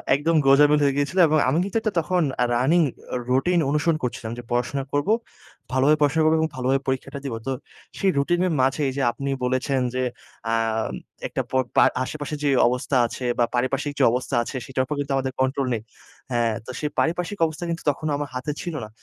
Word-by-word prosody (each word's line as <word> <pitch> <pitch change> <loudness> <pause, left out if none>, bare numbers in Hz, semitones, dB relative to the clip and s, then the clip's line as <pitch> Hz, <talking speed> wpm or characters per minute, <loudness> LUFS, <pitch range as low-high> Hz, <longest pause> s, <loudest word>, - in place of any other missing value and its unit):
একদম 160 +4 +1
গোজামিল 145 +2 +6
হয়ে 140 -1 +3
গিয়েছিল। 145 +6 -1
এবং 155 0 +3
আমি 140 - +1
কিন্তু 200 +3 -2
একটা 215 -2 -1
তখন 180 +2 0 0.2
আ - - +5
running 150 +8 +3 0.3
অ - - 0
রুটিন 155 +8 +2
অনুসরণ 150 +2 +1
করছিলাম 120 -2 -3
যে 120 - -7
পড়াশোনা 125 +3 0
করবো। 145 +9 +2 0.6
ভালোভাবে 135 +4 +4
পড়াশোনা 150 +2 +3
করবো 155 +1 +4
এবং 160 0 +1
ভালোভাবে 130 +1 +1
পরীক্ষাটা 130 +1 -2
দিবো। 120 -5 -3
তো - - 0 0.5
সেই 195 - +2
রুটিনের 175 +5 +1
মাঝেই 135 +1 +1
যে - - 0
আপনি 140 +4 -5
বলেছেন 130 +2 0 0.2
যে, 130 - 0 0.5
আম 115 -1 0 0.4
একটা - - -2
পর 130 0 +2
পার - - +7
আশেপাশে 150 +2 -5
যে 145 - +2 0.2
অবস্থা 125 +2 0
আছে 125 - -6
বা, 120 - +5
পারিপার্শ্বিক 135 +4 0
যে - - +4
অবস্থা 125 +2 -2
আছে, 120 - -7
সেটার 130 -1 -1
উপর 150 - -3
কিন্তু 140 -1 -2
আমাদের 130 -1 -2
control 130 0 0
নেই। 110 - -2 0.5
হ্যাঁ, 120 -2 +1
তো 130 - -6
সেই 150 - -1
পারিপার্শ্বিক 180 +4 -1
অবস্থা 160 +1 -5
কিন্তু 165 -1 -3
তখনও 155 +2 -4
আমার 145 0 -4
হাতে 130 +4 -2
ছিলো 170 -4 -4
না। - - -12
140 Hz, 200 wpm, -24 LUFS, 130-155 Hz, 0.6 s, পার